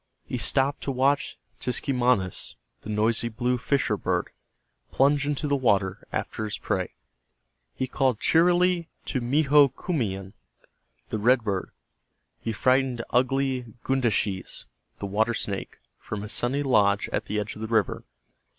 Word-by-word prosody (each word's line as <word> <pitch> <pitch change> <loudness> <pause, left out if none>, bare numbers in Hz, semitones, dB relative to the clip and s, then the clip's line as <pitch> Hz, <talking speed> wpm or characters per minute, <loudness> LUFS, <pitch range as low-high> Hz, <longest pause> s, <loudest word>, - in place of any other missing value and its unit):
He - - -3
stopped 135 +1 +1
to 140 - -2
watch 135 +2 +1 0.2
Tiskemanis, 125 - 0 0.3
the - - -9
noisy 110 +2 +1
blue 125 +2 -1
fisher 140 +3 +1
bird, - - -1 0.6
plunge 145 +1 +3
into 150 0 -1
the 145 - +2
water 100 -8 +1
after 110 - -3
his 105 - -3
prey. - - -2 0.8
He 130 - -1
called 130 -3 +1
cheerily 175 0 +3 0.2
to 130 - -2
Mehokuiman, 135 - +2 0.8
the 110 - -2
red 120 +3 +4
bird. 100 -3 -2 0.7
He 115 - -3
frightened 130 +1 +2
ugly 130 -2 +1
Gundaschees, 110 -7 0 0.3
the - - -5
water 110 +4 +1
snake, 100 -2 -4 0.2
from 105 -1 -5
his 105 - -5
sunny 135 +4 0
log 100 -6 +3
at - - -1
the 105 +1 -1
edge 105 +1 -4
of 105 - -9
the 110 - -3
river. 110 -3 +1
125 Hz, 135 wpm, -26 LUFS, 105-135 Hz, 0.8 s, red